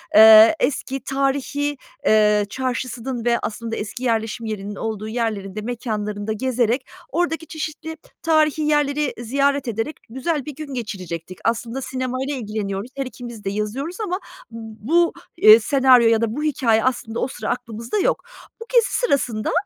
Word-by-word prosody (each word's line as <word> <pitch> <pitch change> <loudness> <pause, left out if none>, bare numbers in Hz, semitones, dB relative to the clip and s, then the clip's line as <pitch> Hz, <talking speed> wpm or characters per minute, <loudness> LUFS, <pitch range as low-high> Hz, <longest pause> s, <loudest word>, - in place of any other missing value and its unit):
eee, 220 +5 +9
eski, 270 -1 -1
tarihî, 275 +2 -1 0.3
eee, 210 -1 +4
çarşısının 255 0 -3
ve 235 -1 +3
aslında 225 +1 -4
eski 210 +4 -6
yerleşim 225 -1 -1
yerinin 205 -2 -5
olduğu 215 0 -4
yerlerinde, 215 -3 -3
mekânlarında 215 -2 -3
gezerek, 250 +2 0 0.2
oradaki 325 0 -1
çeşitli 315 +1 -6 0.2
tarihî 310 -1 +2
yerleri 295 -1 +1
ziyaret 275 +3 0
ederek 225 +6 -2
güzel 275 +4 -2
bir 300 - -7
gün 295 -1 -7
geçirecektik. 185 -7 -6
Aslında 235 +3 -1
sinemayla 260 +2 -3
ilgileniyoruz, 210 -2 -4
her 275 -1 -2
ikimiz 240 -4 -9
de - - -1
yazıyoruz 215 - -3
ama 370 -3 -2 0.3
bu, 230 +10 0 0.2
eee, 215 -7 +9
senaryo 255 0 +5
ya 225 -1 +3
da 230 0 -1
bu 300 - -3
hikâye 235 -7 +2
aslında 235 -3 -1
o - - 0
sıra 215 -4 -5
aklımızda 235 - -3
yok. - - +1 0.4
Bu - - -6
gezi 475 -1 +4
sırasında, 250 - 0
245 Hz, 145 wpm, -22 LUFS, 220-280 Hz, 0.4 s, eee